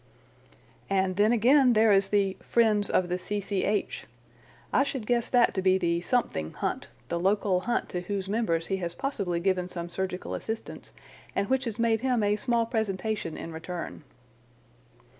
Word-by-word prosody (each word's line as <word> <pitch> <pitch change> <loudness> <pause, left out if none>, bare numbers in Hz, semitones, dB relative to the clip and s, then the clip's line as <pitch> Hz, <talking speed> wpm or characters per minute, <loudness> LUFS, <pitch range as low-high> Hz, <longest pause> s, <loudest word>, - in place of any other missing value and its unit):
"And 190 -1 +1
then 210 +3 +4
again, 250 +3 +5
there 220 0 +5
is 195 0 +3
the 200 -2 +1
'friends 215 -3 +2
of 185 - +2
the 180 +1 -2
C.C.H.' 205 +1 -2 0.7
I - - +5
should 270 -4 -2
guess 240 0 0
that 245 -2 +4
to 190 - -1
be 185 0 +4
the 170 -2 0
Something 175 - -1
Hunt, - - -3 0.2
the 170 - -1
local 195 0 +2
hunt 240 +6 -1
to 180 - -3
whose 195 +1 -3
members 195 -6 0
he 195 - -1
has 175 -2 -4
possibly 200 -11 -2
given 180 0 0
some 175 -1 -6
surgical 185 +1 -4
assistance, 225 0 -6 0.4
and 200 - -1
which 265 0 +2
has 225 -3 -3
made 230 -1 +2
him 250 -4 +1
a 205 0 +2
small 235 +1 +1
presentation 215 -5 -2
in 165 - -7
return." 165 0 -6
200 Hz, 165 wpm, -28 LUFS, 180-225 Hz, 0.7 s, again